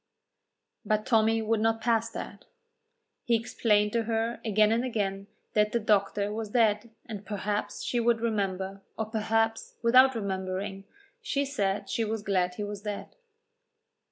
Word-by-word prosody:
But 215 0 0
Tommy 225 -1 +3
would 220 0 +1
not 225 +1 +2
pass 230 0 +1
that. - - -8 0.8
He 235 - +2
explained 210 -2 +1
to 230 -1 +1
her 225 +1 -1
again 215 -1 +3
and 230 +2 +2
again 200 -5 -2 0.3
that 210 0 +2
the 235 - +2
doctor 205 -1 +1
was 220 -1 -4
dead, 220 -1 +2 0.2
and 210 -3 -7
perhaps 205 0 -3
she 245 - 0
would 235 -1 +3
remember, 195 -3 -2 0.2
or 220 - -1
perhaps, 225 +1 0
without 255 +2 +6
remembering, 195 -1 -3 0.4
she 285 - 0
said 200 -7 -1
she 225 - -1
was 220 -1 -3
glad 180 -3 +1
he 210 - -4
was 205 -1 -5
dead. 205 -1 -6
215 Hz, 150 wpm, -28 LUFS, 205-225 Hz, 0.8 s, without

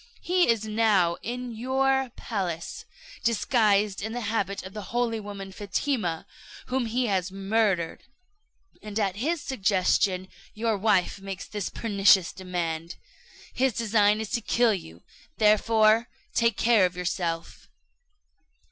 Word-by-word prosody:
He 360 -3 +2
is 225 -2 +2
now 210 -6 +2
in 245 +2 -5
your 265 +2 +1
palace, 180 -7 -4 0.4
disguised 210 -3 +2
in 220 +2 -4
the 245 - -3
habit 205 -3 -2
of 190 +1 -9
the 210 - -5
holy 235 -1 0
woman 200 -2 -8
Fatima, 200 - -2 0.4
whom 255 -2 -1
he 245 +3 0
has 190 -3 0
murdered; 195 -3 0 0.8
at 205 -3 -2
his 310 +8 -1
suggestion 190 -4 +1 0.3
your 225 0 0
wife 200 -1 +1
makes 195 -1 -6
this 205 -3 -4
pernicious 195 -4 +3
demand. 170 -3 -4 0.6
His 260 -1 +1
design 210 -1 +2
is 220 -1 -5
to 235 - 0
kill 230 +1 +2
you, 85 - -8 0.3
therefore 220 +1 +4 0.2
take 230 -3 +2
care 225 -5 +4
of 180 0 -12
yourself." 175 -2 -3
210 Hz, 125 wpm, -26 LUFS, 190-230 Hz, 0.8 s, therefore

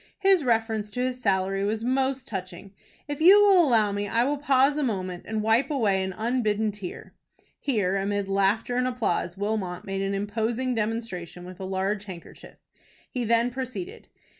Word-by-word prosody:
His 385 -4 +4
reference 225 -3 0
to 230 - -6
his 255 0 -2
salary 195 -2 +1
was 215 +2 -1
most 265 +1 0
touching. 190 -1 -7 0.3
If 290 0 -5
you 380 +5 +8
will 395 -4 +6
allow 220 -5 +3
me, 205 0 -2
I 230 +3 +2
will 285 +2 -1
pause 275 0 +3
a 300 - -1
moment 185 -8 -3
and 220 -1 -2
wipe 225 +6 +2
away 215 -10 +1
an 190 0 -2
unbidden 220 0 0
tear." 200 -3 -9 0.5
(Here 205 -8 0
amid 200 0 -1
laughter 200 +5 +1
and 250 0 +1
applause, 205 -8 -1
Wilmot 200 -3 -3
made 195 0 -3
an 195 0 -1
imposing 225 +5 -1
demonstration 210 -6 -4
with 180 0 -10
a 190 - -5
large 195 +2 -2
handkerchief. 180 -4 -11 0.6
He 250 - -2
then 235 +2 +2
proceeded.) 255 -7 -6
220 Hz, 170 wpm, -26 LUFS, 195-250 Hz, 0.6 s, you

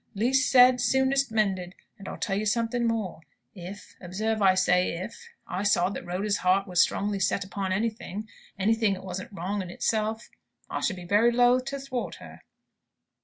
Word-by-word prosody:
'Least 260 +7 +2
said, 250 -1 +6
soonest 265 -1 +2
mended.' 190 -5 -1 0.2
And 195 - -10
I'll - - -6
tell 195 - -2
you 210 +2 -1
something 230 +2 0
more. 215 -8 -2 0.3
If 190 +1 -10
observe 215 +4 -2
I 190 -1 +5
say 180 -1 +2
'if' 185 +6 -8 0.2
I 180 - -4
saw 195 -3 +2
that - - -6
Rhoda's 200 +4 -1
heart 190 +2 +2
was 180 -1 +3
strongly 200 0 0
set 195 +1 +1
upon 195 0 -4
anything, 215 0 -3 0.3
anything 215 0 +2
as 185 - -11
wasn't 185 +1 -6
wrong 195 +2 -3
in 185 - -7
itself, 220 +4 -2 0.4
I - - -2
should 190 - -1
be 180 -1 -9
very 210 +6 +4
loath 245 +1 +3
to 275 +1 -4
thwart 265 -2 -4
her." - - -13
205 Hz, 175 wpm, -27 LUFS, 185-230 Hz, 0.4 s, said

